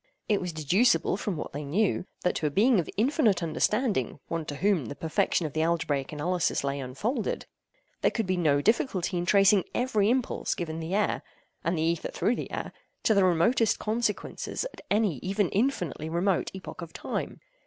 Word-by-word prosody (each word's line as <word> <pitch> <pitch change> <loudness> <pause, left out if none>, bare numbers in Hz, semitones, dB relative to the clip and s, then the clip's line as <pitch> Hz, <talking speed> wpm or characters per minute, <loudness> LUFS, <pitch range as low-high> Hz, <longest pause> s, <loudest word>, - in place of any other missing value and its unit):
It 205 -2 +2
was 180 -1 -3
deducible 165 - +2
from 195 -3 -3
what - - -5
they 145 +2 -4
knew, 180 +6 0 0.2
that 180 - +2
to 155 - 0
a - - +1
being 215 - +4
of 165 - -2
infinite 225 - +2
understanding—one 165 - -1
to 145 - -5
whom 190 -3 +1
the 145 - -6
perfection 165 +2 0
of 150 - -4
the 155 - 0
algebraic 160 -4 0
analysis 170 +3 0
lay 140 0 -1
unfolded—there 225 - -3
could 225 - -2
be 185 0 0
no 150 -5 +2
difficulty 200 - +1
in 175 0 -2
tracing 195 -1 +5
every 220 -5 +2
impulse 250 0 0
given 165 -4 -4
the 165 +4 -3
air—and 185 -4 -2
the 160 - 0
ether 165 0 0
through 240 - 0
the - - -5
air—to 220 - -3
the 200 -2 +4
remotest 185 +6 +3
consequences 220 - -2
at - - -12
any 205 -7 +2
even 195 +4 0
infinitely 180 - -1
remote 175 +2 +1
epoch 190 -1 -8
of 165 -1 -8
time. - - -4
180 Hz, 175 wpm, -28 LUFS, 160-215 Hz, 0.2 s, tracing